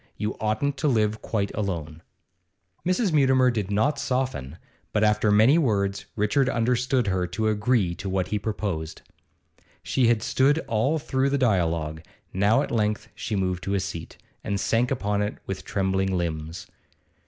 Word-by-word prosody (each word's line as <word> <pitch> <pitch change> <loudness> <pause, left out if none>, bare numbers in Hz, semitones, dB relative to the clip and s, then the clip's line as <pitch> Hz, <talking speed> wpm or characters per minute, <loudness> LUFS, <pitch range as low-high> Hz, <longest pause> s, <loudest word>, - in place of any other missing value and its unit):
You 105 0 -2
oughtn't 110 +6 0
to 155 - 0
live 110 -4 +1
quite 100 -3 -2
alone.' 85 -6 -4 0.8
Mrs. 185 +1 +1
Mutimer 130 -3 +4
did 105 -5 -2
not 110 +9 +1
soften, 125 - -2 0.4
but, 105 - +2
after 105 0 +3
many 110 +10 +5
words, 100 -8 0
Richard 110 +6 +2
understood 125 +1 +1
her 95 -2 0
to 105 +6 -2
agree 105 -3 +1
to 95 +2 -6
what 95 -1 -1
he 105 - -1
proposed. 95 -6 -4 0.8
She 125 -3 +2
had 115 -2 +2
stood 140 +3 +3
all 115 +8 +1
through 135 -2 0
the 140 - +1
dialogue; 85 - 0 0.3
now 100 +4 +3
at - - -6
length 105 -2 0
she 110 - -4
moved 90 -2 -1
to 100 - 0
a - - +2
seat, 85 -4 -6 0.3
and 100 -1 -2
sank 115 +5 +1
upon 105 -6 -1
it 105 +1 -2
with 95 -1 -5
trembling 95 -1 0
limbs. 80 0 -4
105 Hz, 160 wpm, -25 LUFS, 95-125 Hz, 0.8 s, many